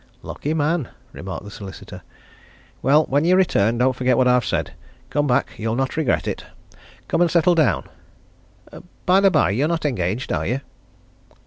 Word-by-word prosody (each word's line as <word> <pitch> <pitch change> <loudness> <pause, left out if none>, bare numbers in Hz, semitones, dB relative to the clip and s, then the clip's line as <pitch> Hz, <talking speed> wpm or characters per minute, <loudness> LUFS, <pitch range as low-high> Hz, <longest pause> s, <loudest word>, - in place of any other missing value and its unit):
"Lucky 150 +2 -4
man!" 155 -2 0 0.2
remarked 95 0 -7
the 100 - -10
solicitor. 100 -2 -10 0.8
"Well, 150 +3 +4
when 145 +3 +1
you 180 +2 +4
return, 120 - +2
don't 130 +1 +2
forget 130 0 +1
what 130 - +3
I've 125 -1 +3
said. - - -2 0.4
Come 145 0 +1
back! 125 - +1
you'll 110 +1 -2
not 135 +1 -1
regret 160 -5 0
it. - - -4 0.6
Come - - 0
and 175 - +4
settle 170 +2 +3
down. 155 -6 +2 1.2
Bye 185 +1 +5
the 195 0 +5
bye, 155 - +2
you're 130 +9 +1
not 165 -1 -2
engaged, 110 -2 -1
are - - -1
you?" 130 +3 -1
135 Hz, 170 wpm, -21 LUFS, 115-160 Hz, 1.2 s, Bye